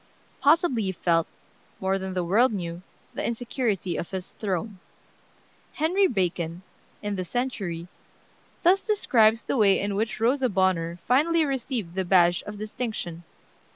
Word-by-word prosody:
Possibly 295 -5 +4
he 190 -2 -1
felt, 165 -2 +1 0.5
more 190 0 0
than 190 0 -5
the 180 - 0
world 220 +9 +3
knew, 175 -4 -4 0.3
the - - -4
insecurity 230 - -1
of 170 - -4
his 190 -1 -6
throne. 195 0 -3 0.9
Henry 365 +6 +2
Bacon, 175 - -2 0.4
in 205 -1 -2
the 185 - -2
Century, 185 -6 -3 0.8
thus 370 +3 +5
describes 230 - +3
the - - -1
way 200 -4 +5
in 200 +1 -2
which 215 0 -2
Rosa 255 +3 +2
Bonheur 180 -3 +1
finally 315 +6 +3
received 250 - -3
the 190 +1 -1
badge 175 -1 +4
of 205 0 -6
distinction. 215 -5 -5
205 Hz, 140 wpm, -26 LUFS, 180-250 Hz, 0.9 s, thus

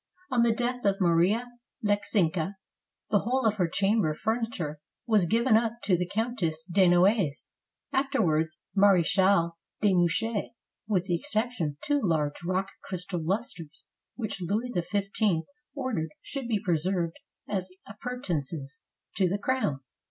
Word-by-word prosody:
On 245 -2 +3
the 235 -1 +4
death 245 +2 -1
of 195 -1 +2
Maria 180 +6 +3 0.4
Leckzinska, 195 -3 +1 0.6
the 205 - +5
whole 255 +4 0
of 215 -1 +2
her 180 -4 +2
chamber 195 -3 +2
furniture 220 -9 -2 0.3
was 215 -6 +3
given 230 +4 +3
up 225 0 +2
to 195 -3 +3
the 180 0 -1
Countess 195 -8 -1
de 185 +1 +4
No 175 0 +5
ailjes, 190 -8 +2 0.5
afterwards 170 - +1
Marechale 190 -2 +4 0.3
de 205 -2 +3
Mouchy, 195 +6 +1 0.3
with 195 -5 +1
the 180 - -1
excep 220 +7 0
tion 175 -10 -2
of 145 0 -7
two 290 -1 +1
large 155 -5 0
rock 185 +2 -1
crystal 180 -2 -4
lusters, 185 - -3 0.3
which 215 -5 -4
Louis 215 +8 -1
XV 195 0 0 0.3
ordered 240 - -2
should 275 -4 -5
be 220 -3 +1
preserved 175 -2 0 0.3
as 190 -2 -2 0.2
appurtenances 175 - -4 0.4
to 190 - +3
the 195 - 0
crown. 205 - -1
195 Hz, 140 wpm, -28 LUFS, 170-225 Hz, 0.6 s, the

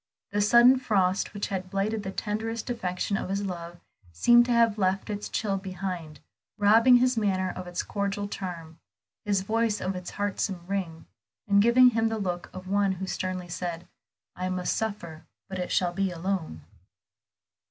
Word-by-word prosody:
The 205 +1 +1
sudden 240 +5 +6
frost 195 -6 +1
which 205 0 -4
had 185 -2 -4
blighted 205 +3 -1
the 190 - -5
tenderest 220 +4 -3
affection 195 -3 -2
of - - -4
his 200 +1 -1
life 175 -2 -6 0.4
seemed 240 - +5
to - - 0
have 230 -2 +3
left 190 +2 0
its 205 0 -4
chill 200 -3 -1
behind, 185 -4 -6 0.4
robbing 225 +5 +6
his 250 0 +2
manner 190 -4 +1
of 185 -1 -8
its 175 0 -3
cordial 200 0 -2
charm, 170 -5 -7 0.5
his 200 -2 +1
voice 220 +1 0
of 190 0 -2
its 180 -1 -6
heartsome 200 -3 -2
ring, 180 -4 -4 0.4
and 200 0 +5
giving 245 +3 +6
him 225 -1 +1
the 225 - -2
look 180 -4 -3
of 185 0 -9
one 200 0 +2
who 190 +1 -5
sternly 185 -1 -3
said 175 0 -5 0.5
"I 185 +1 -3
must 185 -1 -1
suffer, 175 -7 -4 0.2
but 190 -1 -5
it 180 - -3
shall 180 -2 +1
be 195 +1 0
alone." 175 - -3
195 Hz, 170 wpm, -27 LUFS, 180-210 Hz, 0.5 s, sudden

